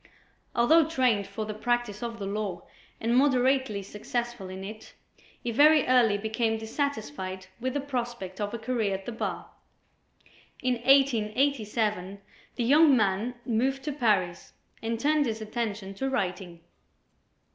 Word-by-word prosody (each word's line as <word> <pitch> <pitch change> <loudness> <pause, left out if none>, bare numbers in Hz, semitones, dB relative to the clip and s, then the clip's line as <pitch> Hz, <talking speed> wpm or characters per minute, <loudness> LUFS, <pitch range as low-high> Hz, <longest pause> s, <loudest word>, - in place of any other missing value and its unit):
Although 310 +7 +5
trained 250 -10 +2
for 220 - -5
the 215 - -4
practice 240 -1 -1
of 235 -1 -4
the 200 - -5
law 200 -3 -3 0.4
and 230 +2 +1
moderately 260 -5 +2
successful 235 0 -4
in 190 +1 -7
it, 215 +2 -9 0.5
he 240 - -1
very 300 +5 +6
early 240 -5 +4
became 220 +2 -1
dissatisfied 210 - -4
with 255 +2 -3
the 285 - 0
prospect 240 -8 -4
of 205 0 -2
a 235 - -4
career 225 -4 -1
at 190 0 -8
the - - -4
bar. 225 - -4 1.1
In 255 0 +2
1887, 225 -5 +1 0.4
the 245 - -1
young 285 +2 +6
man 215 +3 0
moved 260 +4 0
to 300 - -2
Paris 205 -10 0 0.3
and 230 0 -2
turned 295 +1 +2
his 220 -1 -3
attention 210 -3 -4
to 265 +7 -2
writing. 180 -7 -3
230 Hz, 140 wpm, -28 LUFS, 205-255 Hz, 1.1 s, very